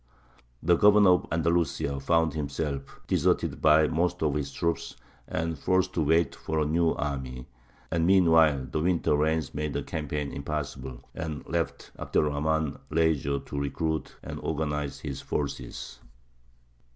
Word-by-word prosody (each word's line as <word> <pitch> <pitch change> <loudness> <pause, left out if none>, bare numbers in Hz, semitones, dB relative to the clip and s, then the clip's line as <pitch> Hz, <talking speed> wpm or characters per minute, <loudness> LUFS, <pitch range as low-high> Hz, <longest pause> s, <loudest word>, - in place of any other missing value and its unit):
The 85 +1 +4
Governor 105 -1 +6
of 90 - +2
Andalusia 85 -4 0
found 80 +2 +2
himself 70 -2 -4
deserted - - +1
by 75 0 +6
most 90 +2 0
of 75 -2 +2
his 70 -1 -2
troops 85 0 -2 0.3
and 80 +1 -2
forced 95 +3 +1
to 85 - 0
wait 80 +3 +3
for 80 - -4
a 75 - +2
new 80 +2 +2
army; 65 -4 -4 0.5
and 85 0 +1
meanwhile 80 -7 +5
the 65 - -3
winter 85 -3 +2
rains 80 0 0
made 75 -1 -3
a - - -1
campaign 75 -2 -3
impossible, 70 -3 -5
and 80 -3 -5
left 85 -1 -3
Abd - - -8
er - - +6
Rahmān 75 0 0
leisure 75 -4 +1
to 70 - -5
recruit 80 +2 -2
and - - -6
organize 75 -2 -2
his 70 -3 -5
forces. 75 -2 -4
75 Hz, 145 wpm, -28 LUFS, 70-80 Hz, 0.5 s, Governor